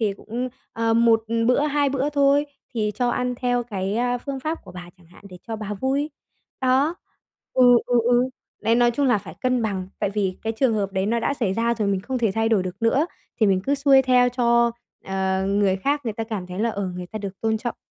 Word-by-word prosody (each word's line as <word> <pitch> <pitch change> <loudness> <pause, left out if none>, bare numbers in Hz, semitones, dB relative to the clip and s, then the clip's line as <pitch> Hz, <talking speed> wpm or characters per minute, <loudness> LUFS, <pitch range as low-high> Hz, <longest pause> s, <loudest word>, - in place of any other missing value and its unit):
thì 210 -3 +1
cũng, 240 +5 -5 0.2
ờ, 225 0 +1
1 230 -1 +4 0.2
bữa, 250 +3 +3
2 290 -1 +1
bữa 275 +2 -1
thôi 285 0 +3 0.3
thì 210 -2 0
cho 245 -1 0
ăn 250 0 -1
theo 245 -1 0
cái, 200 -2 -3
à, 245 +1 0
phương 270 +1 -5
pháp 310 +4 -3
của 185 - -12
bà 175 -1 -9
chẳng 175 - -21
hạn 175 +4 -19
để 180 -1 -12
cho 225 - -4
bà 210 -1 -5
vui. 275 +7 -1 0.5
Đó. 265 +6 +2 0.6
Ừ, 255 - +3 0.2
ừ, 245 -1 +3
ừ, 245 +1 +3 0.3
đấy, 230 - +3
nói 240 0 +4
chung 275 +4 0
là 245 -5 +3
phải - - -10
cân 255 -2 +1
bằng, 190 -4 -2
tại 200 - -1
vì 195 -3 -2
cái 225 - -1
trường 230 0 +1
hợp 200 -2 -1
đấy 190 0 0
nó 230 +2 +1
đã 280 - 0
xảy 210 -8 -1
ra 235 +2 +1
rồi, 215 -3 -1
mình 195 -1 0
không 255 +6 -3
thể 225 -5 +1
thay 225 +1 +1
đổi 210 -5 +2
được 185 +4 -7
nữa, 265 +7 +3 0.3
thì 215 - +5
mình 190 -1 +3
cứ 280 - +2
xuôi 275 -1 +5
theo 250 -1 +4
cho 235 -1 +3 0.3
ờ, 190 0 -1
người 200 -1 +2
khác 280 +9 0
người 225 - -2
ta 225 +1 -4
cảm 210 -5 -5
thấy 180 +1 -7
là, 230 +1 +1
ờ, 200 -2 -3
người 180 - -6
ta 215 - -6
được 195 -2 -7
tôn 220 -1 0
trọng. 240 0 -4
230 Hz, 245 wpm, -23 LUFS, 200-255 Hz, 0.6 s, thì